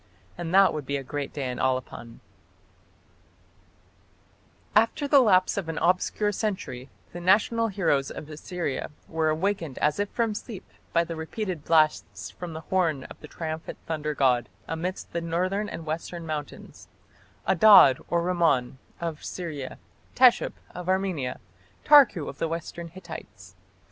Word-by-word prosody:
And 170 -1 -5
that 195 +1 +6
would 150 -4 -5
be 140 - -1
a 135 - -6
great 140 +2 -4
day 140 -3 -4
in 125 - -6
Alban." 130 -3 -3 2.5
After 230 +7 +3
the 280 0 +6
lapse 190 -8 +4
of 180 -5 -3
an 160 - -4
obscure 185 +4 +1
century 185 - -4 0.2
the 175 - -6
national 215 +5 +3
heroes 170 -9 0
of 150 - -8
Assyria 155 -1 -4 0.2
were 160 -1 0
awakened 165 -3 -1
as 150 +4 +1
if 205 0 0
from 230 -2 0
sleep 210 -1 -8 0.2
by 170 - +3
the 170 0 -6
repeated 165 +1 -4
blasts 155 -2 +1
from 175 -2 -8
the 160 - -6
horn 160 -5 0
of - - -11
the 150 - -11
triumphant 160 0 -6
thunder 155 -2 -3
god 125 -3 +2 0.2
amidst 175 +4 -4
the 170 - -1
northern 185 +5 -1
and 165 - -7
western 165 +2 -5
mountains 150 -3 -7 0.6
Adad 190 -8 +7
or 170 0 +1
Rimmon 165 -8 +1 0.2
of 165 -3 -4
Syria, 155 -7 -6 0.4
Teshup 250 -1 +5 0.2
of 180 0 -6
Armenia, 185 -9 -1 0.5
Tarku 275 - +6
of 140 - -8
the 165 - 0
western 170 +1 -5
Hittites. 165 - -11
170 Hz, 145 wpm, -26 LUFS, 150-190 Hz, 2.5 s, Adad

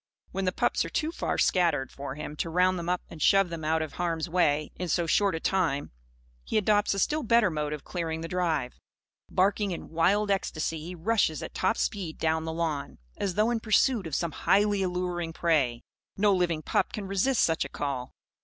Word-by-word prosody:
When 195 0 -2
the 185 - +2
pups - - +1
are - - -5
too 315 0 -1
far - - -2
scattered 170 -7 +2
for 140 -1 -6
him 150 0 -6
to 165 - -2
round 180 +2 +2
them 170 0 -4
up 180 0 0
and 160 - -11
shove 195 -2 +4
them 165 -2 -6
out 160 +1 +1
of 155 - -7
harm's 165 -2 -2
way, 155 -4 +1
in 180 - -4
so 170 +1 +1
short 195 +3 +2
a - - -2
time, 165 -7 0 0.5
he - - -1
adopts 210 -1 +2
a - - -4
still 300 +11 +1
better 235 - +3
mode 150 -1 -2
of 150 -2 -5
clearing 165 -3 -3
the 165 - -4
drive. 165 -8 -1 0.5
Barking 200 +2 +2
in 175 - -5
wild 200 +6 +2
ecstasy, 165 -4 -1
he 175 +3 -7
rushes 175 -4 +1
at - - -7
top - - +1
speed 185 -6 -2
down 160 0 0
the 160 - -3
lawn, 160 -4 -3 0.2
as 190 -3 -2
though 215 +3 +3
in 235 - 0
pursuit 220 -1 +2
of 155 - -3
some 170 -1 -1
highly 205 +4 +2
alluring 180 -2 -2
prey. 140 -9 +1 0.3
No 205 0 +4
living 170 -4 0
pup - - 0
can 210 - -4
resist 195 +6 +2
such 165 -1 +2
a - - -7
call. 135 -3 -4
175 Hz, 210 wpm, -28 LUFS, 160-195 Hz, 0.5 s, shove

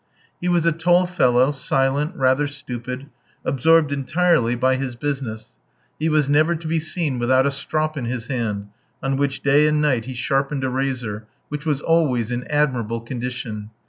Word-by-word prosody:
He 180 - 0
was 175 -2 +2
a 170 - +4
tall 175 +3 +3
fellow, 130 -7 +3
silent, 135 +4 0
rather 130 +2 +2
stupid, 130 -2 -6 0.4
absorbed 150 +3 +3
entirely 140 -2 +2
by 130 +2 +2
his 130 -2 -4
business; 130 -5 -4 0.5
he 160 +1 +1
was 155 -2 +2
never 155 +4 +3
to 160 0 -6
be 160 +1 +1
seen 155 -4 -2
without 130 +2 +3
a 140 - +2
strop 155 +2 -2
in 135 -5 -3
his 120 -1 -3
hand, 105 -6 -3 0.3
on 135 0 0
which 140 -1 -1
day 145 +2 +5
and 150 0 +2
night 130 -7 +1
he 130 0 -6
sharpened 135 +3 -1
a 130 - 0
razor, 125 -5 -3 0.2
which 150 +2 -5
was 150 -2 0
always 135 -9 +2
in 120 +1 -3
admirable 125 -6 0
condition. 120 -3 -5
135 Hz, 175 wpm, -22 LUFS, 125-150 Hz, 0.5 s, day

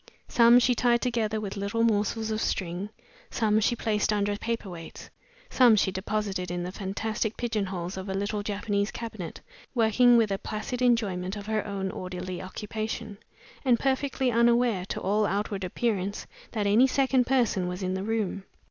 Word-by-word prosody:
Some 235 0 +6
she 250 0 +4
tied 240 0 +3
together 230 -3 -1
with 205 -2 -5
little 200 +3 -1
morsels 220 0 +1
of 215 0 -1
string; 185 +2 -2 0.4
some 215 -2 +2
she 230 +3 +2
placed 215 -2 0
under 205 -1 +1
paper 230 0 -3
weights; 170 -3 -9 0.4
some 245 -4 +6
she 195 -2 +2
deposited 190 -1 -2
in 175 0 -3
the 180 - -4
fantastic 215 +3 -3
pigeon 220 -5 -1
holes 180 0 -5
of 190 +1 -6
a 190 - -2
little 205 +1 -1
Japanese 205 0 -1
cabinet 220 -8 -7 0.3
working 240 +1 +5
with 220 -3 +3
a 195 - -1
placid 220 +4 -4
enjoyment 205 -6 +1
of 205 -1 -7
her 215 0 -1
own 195 -1 -3
orderly 185 -1 -5
occupation, 215 +2 -5 0.4
and 245 -4 +3
perfectly 265 -1 0
unaware, 235 -4 +3
to - - -4
all 205 +2 +1
outward 200 0 -2
appearance, 200 0 -2 0.3
that 215 -3 -1
any 220 +6 +5
second 265 -2 +2
person 235 -8 +2
was 180 +2 -4
in 185 0 -1
the 190 - -2
room. 210 -3 -2
210 Hz, 170 wpm, -27 LUFS, 195-230 Hz, 0.4 s, Some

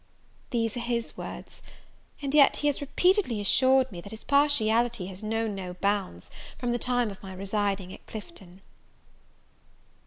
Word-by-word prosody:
These 230 -3 0
were 240 - -4
his 235 -1 -2
words; - - -8 0.6
and 275 0 -2
yet, 290 -2 +6
he - - -3
has 285 - -2
repeatedly 355 - +2
assured 260 +5 +4
me, 175 -3 -7
that 200 - -10
his 220 +1 -10
partiality 240 -7 +2
has 190 +1 -8
known 220 0 -1
no 185 -2 -6
bounds 195 - -2 0.3
from 245 -1 -1
the 240 - 0
time 245 -3 0
of 195 - -12
my 190 -1 -8
residing 195 -1 -1
at - - -14
Clifton. 195 - -10
225 Hz, 155 wpm, -28 LUFS, 195-255 Hz, 0.6 s, yet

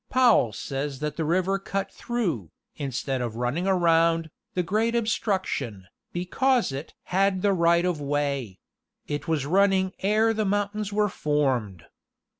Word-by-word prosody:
Powell 245 - +4
says 135 +5 -4
that 150 +1 -3
the 160 - -2
river 185 +5 +1
cut 195 0 -3
through, 175 - -2 0.3
instead 135 -2 -3
of 120 -3 -3
running 125 +10 -1
around, 165 -3 +3 0.2
the 180 - +1
great 220 +6 0
ob 230 -2 +1
struction, 145 - -1 0.3
because 240 - +1
it 135 +3 -7 0.2
"had 190 0 +2
the 200 -1 +4
right 170 -1 +3
of 175 -5 -1
way;.. 140 -8 -1 0.5
it 145 +2 -4
was 155 -4 0
running 190 +2 +3
ere 215 +3 +3
the 220 0 0
mountains 205 +1 -1
were 210 0 +2
formed." 130 - -1
170 Hz, 145 wpm, -26 LUFS, 140-200 Hz, 0.5 s, Powell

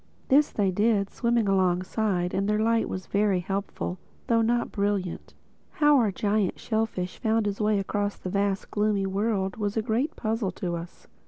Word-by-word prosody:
This 285 +2 +5
they 200 -3 0
did, 205 0 +1
swimming 235 -3 +1
alongside; 185 0 +1
and 195 +2 0
their 210 - +2
light 225 +1 +2
was 185 -1 -5
very 200 -2 +1
helpful, 195 0 -4 0.3
though 230 -1 +3
not 235 +1 +1
brilliant. 200 -3 -2 0.4
How 295 -1 +4
our 220 -4 +2
giant 205 0 0
shellfish 220 -5 -2
found 220 -1 +1
his 205 +1 -2
way 210 0 +2
across 205 +1 -2
that 185 - -6
vast 200 0 0
and - - -21
gloomy 210 -2 +1
world 195 -1 -1
was 210 0 -2
a 220 - +1
great 250 +7 -1
puzzle 220 -2 -1
to 175 -2 -3
us. 170 +1 -9
205 Hz, 175 wpm, -26 LUFS, 190-220 Hz, 0.4 s, This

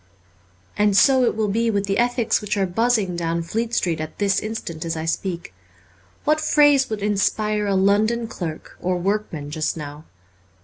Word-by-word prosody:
And 205 -1 +3
so 260 0 +5
it - - 0
will 215 -1 0
be 230 +3 +1
with 200 -2 0
the 195 +2 0
ethics 240 -1 +1
which 210 0 -2
are 195 - +2
buzzing 210 -1 +1
down 170 0 -1
Fleet 225 +7 -2
Street 165 -3 0
at 155 - -7
this 200 -1 +2
instant 210 -7 -5
as 165 -1 -3
I 160 - -3
speak. 170 - -3 0.7
What 305 +1 +2
phrase 290 -3 +4
would 215 -2 -4
inspire 210 +1 0
a 200 - +1
London 215 +4 +2
clerk 165 -7 -7
or 180 0 0
workman 175 -6 -2
just 155 +1 -2
now 150 0 -8
200 Hz, 175 wpm, -22 LUFS, 170-225 Hz, 0.7 s, so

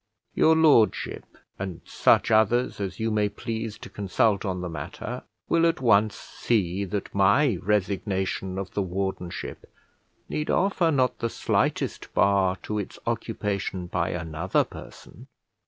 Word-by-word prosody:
Your 160 - +5
Lordship, 150 -9 +3 0.3
and 95 -3 -5
such - - +3
others 110 +3 +3
as 95 -2 -4
you 110 0 0
may 105 -1 +2
please 110 +1 -5
to - - -10
consult 100 +1 +1
on 95 -3 -2
the 90 - -3
matter, 85 - -6 0.3
will 165 0 +3
at 165 +1 0
once 110 -4 +3
see 100 -4 -1
that 100 +1 -4
my 100 - +3
resignation 95 -1 -1
of 95 -1 -4
the 100 - 0
wardenship 95 -1 -4 0.6
need 150 - -3
offer 190 -3 +2
not 130 -5 +1
the 115 - -1
slightest - - -1
bar 95 -1 +3
to 105 0 -2
its 100 - -6
occupation 105 -5 -2
by 85 -1 -1
another 80 -2 0
person. - - -12
100 Hz, 140 wpm, -26 LUFS, 95-115 Hz, 0.6 s, Your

